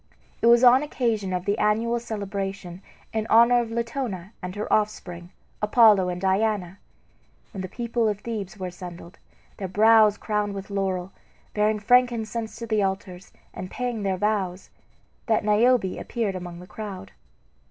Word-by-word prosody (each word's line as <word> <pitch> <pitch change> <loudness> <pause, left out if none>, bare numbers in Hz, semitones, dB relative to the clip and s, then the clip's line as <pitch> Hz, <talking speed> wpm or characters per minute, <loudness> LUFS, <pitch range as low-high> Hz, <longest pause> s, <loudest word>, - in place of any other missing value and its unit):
It - - +3
was 235 +1 +6
on 250 +1 +7
occasion 230 -9 -1
of 180 0 -2
the 205 +2 0
annual 230 +3 +1
celebration 195 -4 -5 0.3
in 220 0 -2
honor 235 +2 +6
of 235 - -5
Latona 230 -5 -4
and 180 0 -6
her 210 - -3
offspring, 180 -5 -2 0.3
Apollo 210 -3 +5
and 180 0 -4
Diana, 195 -1 0 0.7
when 195 - -5
the 185 - -4
people 235 +2 -1
of 205 -1 -4
Thebes 215 -4 -5
were 185 - -5
assembled, 180 -1 -9 0.4
their 195 - -4
brows 215 +2 +5
crowned 210 -2 -2
with 195 +1 -7
laurel, 190 -2 -2 0.4
bearing 210 +1 +2
frankincense 230 0 +1
to 230 - -6
the 215 -2 +1
altars 190 -1 -4 0.2
and 185 - -7
paying 245 -1 -3
their 195 -2 -1
vows, 195 -2 -2 0.6
that 220 -2 +2
Niobe 215 -1 +3
appeared 225 -5 -2
among 175 -1 -7
the - - -11
crowd. 200 - -8
210 Hz, 155 wpm, -25 LUFS, 190-225 Hz, 0.7 s, on